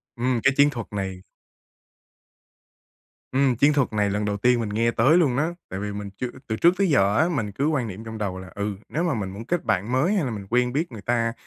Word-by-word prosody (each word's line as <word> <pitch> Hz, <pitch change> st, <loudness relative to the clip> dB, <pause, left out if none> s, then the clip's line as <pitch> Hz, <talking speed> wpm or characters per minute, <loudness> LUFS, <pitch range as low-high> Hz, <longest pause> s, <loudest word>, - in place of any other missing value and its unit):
Ừm, 125 Hz, 0 st, 0 dB
cái 140 Hz, -, +4 dB
chiến 145 Hz, 0 st, +6 dB
thuật 120 Hz, -6 st, -6 dB
này 95 Hz, -2 st, -4 dB, 2.1 s
Ừm, 135 Hz, -1 st, +2 dB
chiến 140 Hz, +5 st, +4 dB
thuật 140 Hz, -6 st, +1 dB
này 105 Hz, -1 st, +1 dB
lần 105 Hz, +1 st, -1 dB
đầu 105 Hz, 0 st, -1 dB
tiên 120 Hz, +3 st, +3 dB
mình 110 Hz, -, -2 dB
nghe 115 Hz, +3 st, +1 dB
tới 135 Hz, +9 st, +4 dB
luôn 140 Hz, -8 st, +2 dB
á, 155 Hz, +3 st, +1 dB, 0.2 s
tại 95 Hz, -, -5 dB
vì 105 Hz, +1 st, -3 dB
mình 100 Hz, 0 st, -5 dB
chưa 125 Hz, -, -2 dB, 0.2 s
từ 110 Hz, -, -1 dB
trước 170 Hz, +10 st, +4 dB
tới 195 Hz, -2 st, +2 dB
giờ 105 Hz, -7 st, +3 dB
á, 160 Hz, +3 st, +3 dB
mình 115 Hz, -11 st, -2 dB
cứ 140 Hz, +9 st, -1 dB
quan 140 Hz, -7 st, 0 dB
niệm 100 Hz, +2 st, -7 dB
trong 110 Hz, 0 st, -7 dB
đầu 100 Hz, -3 st, -3 dB
là, 95 Hz, 0 st, -10 dB
ừ, 100 Hz, 0 st, -2 dB
nếu 160 Hz, -, -1 dB
mà 170 Hz, -4 st, +1 dB
mình 100 Hz, -4 st, -3 dB
muốn 100 Hz, +4 st, -8 dB
kết 175 Hz, +4 st, -1 dB
bạn 100 Hz, +5 st, 0 dB
mới 135 Hz, +10 st, +2 dB
hay 190 Hz, -8 st, +1 dB
là 125 Hz, -, -2 dB
mình 100 Hz, -3 st, -6 dB
quen 125 Hz, +1 st, +2 dB
biết 160 Hz, +2 st, -1 dB
người 110 Hz, -4 st, -8 dB
ta, 115 Hz, 0 st, 0 dB
115 Hz, 250 wpm, -24 LUFS, 105-140 Hz, 2.1 s, chiến